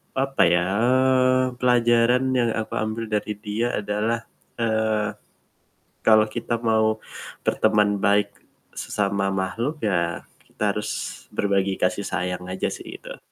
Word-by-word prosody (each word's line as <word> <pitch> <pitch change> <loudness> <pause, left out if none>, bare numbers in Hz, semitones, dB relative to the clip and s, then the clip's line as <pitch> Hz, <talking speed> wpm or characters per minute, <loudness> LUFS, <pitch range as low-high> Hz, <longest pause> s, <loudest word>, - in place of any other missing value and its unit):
papa 135 0 +2
ya, 90 +1 +2 0.2
eee, 130 0 +3
pelajaran 120 0 +3
yang 120 -2 +2
aku 110 - -5
ambil 110 +1 -3
dari 105 0 -1
dia 105 +3 -2
adalah, 105 +3 -1 0.4
eee, 110 -2 0 0.9
kalau 110 -1 +6
kita 120 +1 -3
mau 110 -1 +2 0.4
berteman 105 -1 +2
baik 100 +1 +2 0.5
sesama 100 -1 -1
makhluk, 115 +11 -2
ya, 85 -5 0 0.2
kita - - -10
harus - - -3 0.5
berbagi 100 -1 +1
kasih 95 +2 0
sayang 90 0 -3
aja 95 +1 -2
sih, - - -8
gitu. - - -10
110 Hz, 120 wpm, -23 LUFS, 100-120 Hz, 0.9 s, kalau